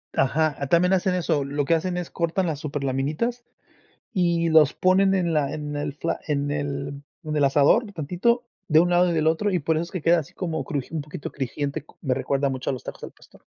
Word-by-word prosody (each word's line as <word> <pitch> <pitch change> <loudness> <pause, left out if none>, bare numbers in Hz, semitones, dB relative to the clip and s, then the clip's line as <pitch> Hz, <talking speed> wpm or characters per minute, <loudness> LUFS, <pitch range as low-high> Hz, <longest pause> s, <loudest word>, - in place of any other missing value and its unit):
Ajá, 140 +1 +1
también 180 +3 +4
hacen 185 0 +2
eso. 165 -5 0
Lo 140 +1 -2
que 165 - +2
hacen 175 +2 0
es 175 -1 -5
cortan 170 +2 0
las 155 -4 -2
súper 145 -2 -4
laminitas, 150 - -1 0.7
y 170 -4 +2
los 155 -2 +5
ponen 190 +1 +3
en 175 -3 +1
la 145 -3 +1
en 150 -1 -5
el 145 -1 -3
fla 165 +3 -3
en 145 -1 0
el 140 -1 -4 0.2
en 155 -1 -3
el 145 - +2
asador. 150 - +3
Tantito, 180 - 0 0.2
de 155 0 +5
un 175 +2 +3
lado 175 0 +4
y - - 0
del 155 -1 +1
otro, 185 +6 +1
y 180 - +1
por 160 +2 0
eso, 160 - 0
es 170 - -10
que 185 - -4
queda 170 +3 +4
así 165 +3 -9
como 165 -5 -3
cruji 140 0 -4
un 155 - -1
poquito 150 +1 -7
crujiente. 140 +2 -4 0.2
Me 135 -4 0
recuerda 140 +1 0
mucho, 130 -1 -3
a - - -2
los 130 - -7
tacos - - -8
al - - -7
pastor. - - -21
155 Hz, 230 wpm, -24 LUFS, 140-175 Hz, 0.7 s, los